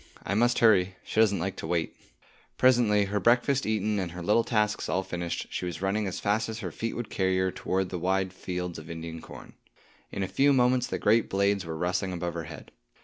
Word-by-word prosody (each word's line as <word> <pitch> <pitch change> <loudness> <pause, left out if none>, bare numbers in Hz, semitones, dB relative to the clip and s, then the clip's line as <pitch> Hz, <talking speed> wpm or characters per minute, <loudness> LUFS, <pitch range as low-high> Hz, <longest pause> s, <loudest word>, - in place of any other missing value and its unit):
I 100 - -1
must 120 +4 +3
hurry; 95 -5 +4
she - - -3
doesn't 105 -3 +4
like 95 +3 -3
to - - -5
wait." 85 -2 -1 0.6
Presently, 115 -5 +4
her 105 +1 -1
breakfast 125 +4 +2
eaten 105 -1 0
and 90 -3 -3
her 90 0 -7
little 105 +5 +3
tasks 105 -3 0
all 95 - 0
finished, 85 -2 -4
she - - -3
was 90 +1 -4
running 100 +2 0
as 95 - -4
fast 105 +2 0
as 110 - -5
her 95 -7 -5
feet 115 +7 -4
would 120 -2 -5
carry 95 -1 +1
her 95 0 +1
toward 95 +1 -2
the 90 - -4
wide 95 +1 0
fields 90 -2 -5
of 80 - -12
Indian 80 0 -6
corn. - - -12 0.6
In 100 - -3
a - - -2
few 140 +7 +3
moments 125 -1 +3
the - - -3
great 110 +2 +2
blades 100 0 +1
were 80 -1 -4
rustling 90 +2 -1
above 85 -1 -3
her 85 -1 -5
head. 75 -3 -10
95 Hz, 220 wpm, -28 LUFS, 90-110 Hz, 0.6 s, hurry